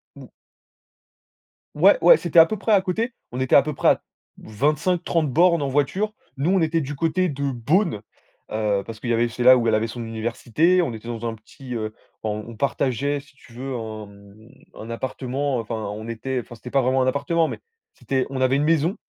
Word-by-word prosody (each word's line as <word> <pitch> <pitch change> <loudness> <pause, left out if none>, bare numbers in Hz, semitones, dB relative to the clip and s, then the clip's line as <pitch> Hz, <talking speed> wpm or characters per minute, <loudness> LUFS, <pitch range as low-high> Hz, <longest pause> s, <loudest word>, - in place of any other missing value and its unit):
Ou - - -12 1.5
ouais, - - +6
ouais - - +8
c'était 170 0 +3
à 165 - +10
peu 215 +4 -4
près 220 - -2
à 200 -2 +5
côté, 220 +6 -2 0.2
on 125 - -5
était 130 - +2
à - - +9
peu 150 - -3
près - - 0
à - - +2 0.4
25, 150 - 0
30 160 -4 0
bornes 170 +2 +4
en 140 - -1
voiture, 150 +10 0 0.2
nous 145 +7 +1
on 190 -2 +3
était 160 0 +1
du 145 +1 -5
côté 170 +4 0
de 140 -1 -2
Bonn, 125 - 0 0.5
heu, 105 -2 0
parce 115 -1 -9
que - - -6
il - - -1
y - - +3
avait 120 +1 +2
c'est 120 +1 -4
là 130 +1 +8
où 115 -2 0
elle 110 - +2
avait 110 +1 0
son 115 +1 -6
université. 120 +10 +1
On 130 - -3
était 110 +1 -9
dans 120 -1 -5
un 115 - -3
petit 125 +4 -11
heu 110 -1 -4 0.3
en 105 0 -3
on 115 - -9
partageait 140 +2 -1
si 140 -1 -23
tu 120 - -19
veux, 130 +3 -5
un 110 -2 -6
mmh 100 +2 -17 0.3
un 110 - -9
appartement 130 +3 -3
enfin 115 0 -4
on 110 0 -5
était 125 +3 -3
enfin 120 - -12
c'était 125 +2 -10
pas 135 - +3
vraiment 130 +1 +2
un 130 - +1
appartement, 155 +5 +1
mais - - -6 0.3
c'était 130 -1 -2
on 135 -1 -4
avait 130 +1 +3
une 145 - +1
maison. 165 +4 +2
130 Hz, 225 wpm, -23 LUFS, 115-155 Hz, 1.5 s, à